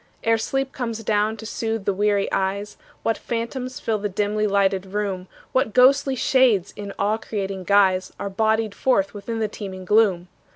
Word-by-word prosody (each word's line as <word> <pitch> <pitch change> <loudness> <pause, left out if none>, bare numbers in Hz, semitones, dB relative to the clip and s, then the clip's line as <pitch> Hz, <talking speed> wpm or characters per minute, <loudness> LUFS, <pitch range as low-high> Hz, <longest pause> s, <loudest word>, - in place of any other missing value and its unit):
Ere 225 0 +4
sleep 270 +3 -1
comes 230 -3 -4
down 215 +1 +1
to 220 - -9
soothe 225 -2 -3
the 200 - +1
weary 205 0 +1
eyes, 200 +2 -1 0.3
What 225 - 0
phantoms 250 +2 -4
fill 220 -2 -1
the 205 +1 -2
dimly 210 +2 0
lighted 195 -1 +1
room; 195 -2 -3 0.2
What 255 -5 0
ghostly 270 +2 +5
shades 240 -7 +3
in 200 -1 -6
awe 210 +2 +1
creating 195 -4 -4
guise 190 -2 +3
Are - - -3
bodied 220 +1 +1
forth 200 -7 +1
within 220 +2 -5
the 220 -1 0
teeming 190 -3 -7
gloom. 195 -4 +3
210 Hz, 170 wpm, -23 LUFS, 195-225 Hz, 0.3 s, ghostly